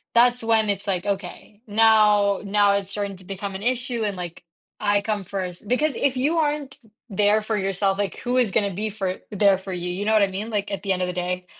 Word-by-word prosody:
that's 245 0 +4
when 225 -1 +3
it's 200 +1 -2
like, 185 0 -1
"Okay, 200 +1 -5
now 210 -2 +4
now 205 0 +3
it's 200 -1 -1
starting 200 -1 -3
to 185 - -13
become 195 +1 -5
an 190 - -6
issue 250 -1 -1
and, 200 -3 -2
like, 175 -1 -7 0.4
I 205 -1 +2
come 210 -2 -2
1st," 185 +1 -5
because 270 +2 +1
if 265 -2 +1
you 300 +6 +1
aren't 295 -3 -2 0.3
there 205 +2 +2
for 215 0 -2
yourself, 195 0 0
like, 200 - -2
who 250 +1 -1
is 240 -5 +3
gonna 200 -3 +1
be 215 +4 -2
for 195 -3 -3
there 200 -1 +4
for 190 0 -8
you, 180 0 -4
you 200 +3 -3
know 220 - +2
what 215 -2 +5
I - - +3
mean, 200 +4 -5
like, 205 -1 -2
at 200 - -3
the 195 - -1
end 185 - -3
of - - -1
the 180 - -3
day. 180 +1 -3
205 Hz, 240 wpm, -23 LUFS, 195-220 Hz, 0.4 s, what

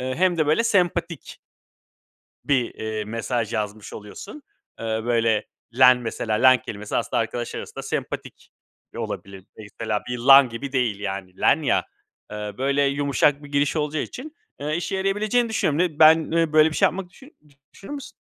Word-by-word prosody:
eee, 130 0 -3
hem 180 +1 +1
de 155 - +2
böyle 155 +10 +2
sempatik 175 -6 -1 1.1
bir, 130 -5 0
eee, 110 -1 -4
mesaj 115 +1 -3
yazmış 105 -1 -4
oluyorsun. 195 - -10 0.4
Eee, 110 -1 -2
böyle 115 -2 +1 0.3
"len" 125 -1 +7
mesela 115 -2 -3
"len" 130 +2 +5
kelimesi 105 0 -5
aslında - - 0
arkadaş 115 +1 -4
arasında - - -7
sempatik - - -6 0.5
olabilir. 95 -1 -6
Mesela 110 0 -4
bir 125 0 -3
"lan" 135 +1 +7
gibi 130 +4 -7
değil 120 -6 0
yani 95 -2 -6
"len" - - +3
ya, - - +1 0.4
eee, 105 -1 -6
böyle 140 +1 +1
yumuşak 140 +1 +1
bir - - -10
giriş 145 +2 +1
olacağı 150 0 -1
için, 300 +5 -9 0.3
eee, 150 +2 -2
işe 185 +3 -3
yarayabileceğini 210 +5 0
düşünüyorum. 160 -9 0
Ne 170 -4 0
ben, 160 0 +6
eee, 165 -2 +1
böyle 155 +1 +5
bir - - -5
şey - - +5
yapmak 180 +1 -4
düşünür 270 +7 -17
mü 150 - -26 0.3
düşünür 195 - -10
müsün? 285 -2 -7
135 Hz, 170 wpm, -23 LUFS, 110-165 Hz, 1.1 s, len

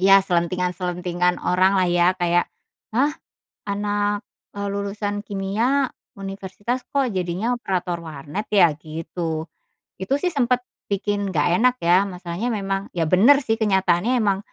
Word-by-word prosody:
ya. 195 +1 +7
selentingan-selentingan 180 0 0
orang 185 +2 +3
lah 185 - +4
ya 175 +1 +3
kayak, 175 -1 +1 0.5
"Hah? 285 +4 +3 0.5
Anak," 205 +1 -1 0.3
eee, 200 0 -3
"lulusan 205 +1 -3
kimia, 220 +8 0 0.3
universitas, 195 +5 -5
kok 275 -3 +2
jadinya 185 +5 -1
operator 180 -6 -2
warnet 155 +4 -6
ya?" 180 -5 +6
Gitu, 160 +1 -5 0.5
itu 190 +8 -1
sih 360 - +1
sempet 250 -2 +1 0.3
bikin 200 0 -1
nggak 150 0 +2
enak 250 +1 +4
ya. 180 +3 +5
Masalahnya 180 +4 -4
memang 195 -1 -2
ya 165 -2 +1
bener 235 +10 +6
sih 225 0 +1
kenyataannya 195 +3 +2
emang, 200 -2 +2
195 Hz, 130 wpm, -22 LUFS, 175-205 Hz, 0.5 s, ya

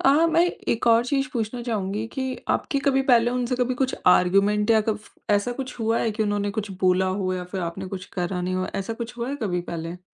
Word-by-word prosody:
अ, 270 - +7 0.2
मैं 335 +1 +4 0.2
एक 235 +1 0
और 230 +1 +5
चीज़ 275 +1 0
पूछना 235 0 -2
चाहूँगी 215 -2 -2
कि 265 - -2 0.3
आपकी 280 - 0
कभी 270 -1 +4
पहले 240 0 +5
उनसे 250 0 -1
कभी 250 0 0
कुछ 260 +1 0
आर्ग्युमेंट 200 +4 +4
या 220 -1 +6
कफ 215 0 -2 0.2
ऐसा 205 +4 +2
कुछ 255 -2 -6
हुआ 225 0 +1
है 225 - +1
कि 215 +1 -1
उन्होंने 205 -1 0
कुछ 205 -1 -3
बोला 185 0 +3
हो 185 -1 0
या 180 -1 -4
फिर 190 - -2
आपने 175 +3 -4
कुछ 185 0 -6
करा 180 0 -2
नहीं 185 +1 -2
हो? 185 0 -1
ऐसा 195 +3 -2
कुछ 240 +1 -8
हुआ 235 +2 -2
है 285 - -3
कभी 180 -4 0
पहले? 170 +1 -5
215 Hz, 230 wpm, -24 LUFS, 190-245 Hz, 0.3 s, अ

